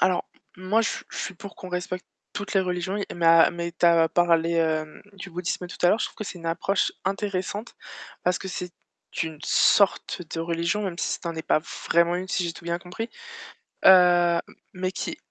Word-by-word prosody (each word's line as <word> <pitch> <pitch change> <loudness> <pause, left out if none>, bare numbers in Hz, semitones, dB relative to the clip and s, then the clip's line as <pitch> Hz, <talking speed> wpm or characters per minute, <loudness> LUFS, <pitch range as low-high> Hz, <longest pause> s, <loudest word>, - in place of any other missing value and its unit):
Alors 185 -1 +2 0.3
moi 185 +5 +1
je - - +1
suis - - -6
je - - -8
suis 190 - -4
pour 200 +3 -10
qu'on 185 - -9
respecte 180 +1 -3 0.3
toutes 205 0 -4
les 195 - +5
religions, 180 +2 -2 0.2
mais 165 -1 +6
mais 170 0 -4
tu 175 - +2
as 165 -1 +5
parlé 170 -1 +2 0.6
du 195 -1 -9
bouddhisme 180 +1 -3
tout - - -10
à - - +6
l'heure, 215 - +3
je - - +1
trouve - - -13
que 215 - -5
c'est 190 - -7
une 165 - -8
approche 185 +4 +1
intéressante 200 +2 -3 0.5
parce 180 0 +2
que 190 - -7
c'est 180 -1 -5 0.5
une 160 -2 -5
sorte 200 -2 +3
de 165 - -2
religion, 170 +4 -1
même 180 -3 -4
si - - -1
ça 170 - -3
en 165 - -8
est 160 - -3
pas - - +3 0.3
vraiment 170 +1 +4
une 185 +1 -4
si 185 - 0
j'ai 170 - -2
tout 170 - -13
bien 170 0 -1
compris, 225 +7 -6 0.8
heu, 175 -2 +7 0.4
mais 185 0 -2
qui - - -4
180 Hz, 205 wpm, -25 LUFS, 170-190 Hz, 0.8 s, heu